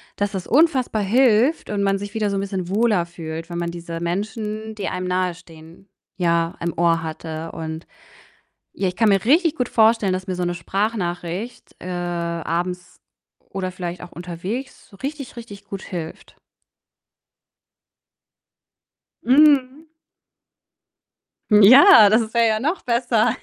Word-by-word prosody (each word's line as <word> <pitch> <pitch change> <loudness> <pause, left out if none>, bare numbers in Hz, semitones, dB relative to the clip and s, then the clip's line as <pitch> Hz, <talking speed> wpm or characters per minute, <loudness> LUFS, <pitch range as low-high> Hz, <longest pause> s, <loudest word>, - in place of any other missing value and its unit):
dass 205 0 -1
das 190 -3 -5
unfassbar 265 -7 +2
hilft 240 +6 +2
und 205 -1 -1
man 195 0 +1
sich 205 +2 -7
wieder 215 -2 -1
so 200 - -2
'n - - 0
bisschen 190 -3 -4
wohler 205 -3 +2
fühlt, 165 -1 -8
wenn 170 - -5
man 170 0 -2
diese 170 -1 -7
Menschen, 215 +4 -4
die 205 -2 -4
einem 185 0 -3
nahe 180 -1 -1
stehen, 165 +2 -16 0.3
ja, 170 -1 0
im 170 -1 -2
Ohr 165 -1 +2
hatte. 160 0 -6
Und, 160 0 -6 0.9
ja, 195 - -2
ich 180 - -4
kann 225 - +3
mir 195 0 +2
richtig 320 +5 +3
gut 250 - -1
vorstellen, 220 -3 +3
dass 185 0 -3
mir 185 - -2
so 180 - -2
'ne 175 0 -2
Sprachnachricht, 190 +2 -4
äh, - - -9
abends 175 0 -3 0.5
oder 185 -1 -4
vielleicht 180 -1 -6
auch 175 - -10
unterwegs 180 +10 -7
so 200 - -16
richtig, 275 0 -6
richtig 215 -4 -10
gut 195 -1 -7
hilft. 165 -3 -8 2.9
Mhm. 285 +2 +3 1.6
Ja, 215 - +8
das 220 0 +2
wäre 235 0 +4
ja 215 0 0
noch 310 - -2
besser. 235 -2 +1
195 Hz, 145 wpm, -21 LUFS, 175-225 Hz, 2.9 s, Ja